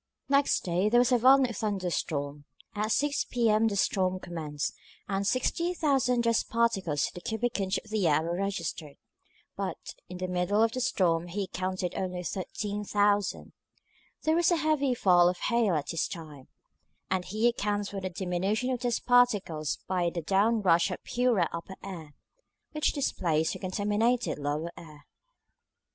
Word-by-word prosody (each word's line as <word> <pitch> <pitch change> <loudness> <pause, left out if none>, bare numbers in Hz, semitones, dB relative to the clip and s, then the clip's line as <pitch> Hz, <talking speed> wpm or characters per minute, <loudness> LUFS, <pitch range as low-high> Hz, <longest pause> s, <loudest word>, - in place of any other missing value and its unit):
Next 280 0 +3
day 180 +3 +1
there 240 +2 +5
was 250 +1 +3
a 245 - +4
violent 255 -1 +5
thunder 195 -4 -2
storm. 145 -2 -3 0.3
At 215 +1 -1
6 290 +4 +1
P.M. 225 -2 +2
the 210 - -1
storm 185 -1 +1
commenced, 155 -5 -4 0.3
and 195 0 -1
60,000 270 -2 +1
dust 230 -1 +1
particles 195 -11 +1
to - - -6
the 175 - -9
cubic 225 +3 -2
inch 190 0 0
of 215 - -9
air 165 -8 +2
were 170 +1 -2
registered; 175 -6 -4 0.6
but - - -5 0.2
in 180 - -7
the 185 0 -3
middle 180 +4 +1
of 225 - +2
the 255 - -3
storm 170 -7 +1
he 195 +3 -3
counted 185 -1 -3
only 180 -1 -3
13,000. 205 +2 -1 0.7
There 315 - +2
was 345 0 +3
a 350 - +3
heavy 305 -5 +1
fall 175 -5 +5
of 180 - -3
hail 230 -5 +1
at 150 - -2
this 165 - -1
time, 155 -7 -9 0.6
and 185 -1 +1
he 215 +6 0
accounts 205 -3 -1
for 195 -1 -5
the 185 - -3
diminution 190 +7 -1
of 250 - -1
dust 240 -1 -2
particles 205 -11 +2
by 180 -2 0
the 170 -1 -5
down 210 +5 +2
rush 170 0 +4
of 180 - -6
purer 240 -8 +1
upper 170 +3 -6
air, 165 -7 -8 0.6
which 305 -1 0
displaced 165 - 0
the - - -7
contaminated 210 +4 0
lower 150 +4 -2
air. 150 -3 -13
195 Hz, 160 wpm, -29 LUFS, 175-235 Hz, 0.7 s, there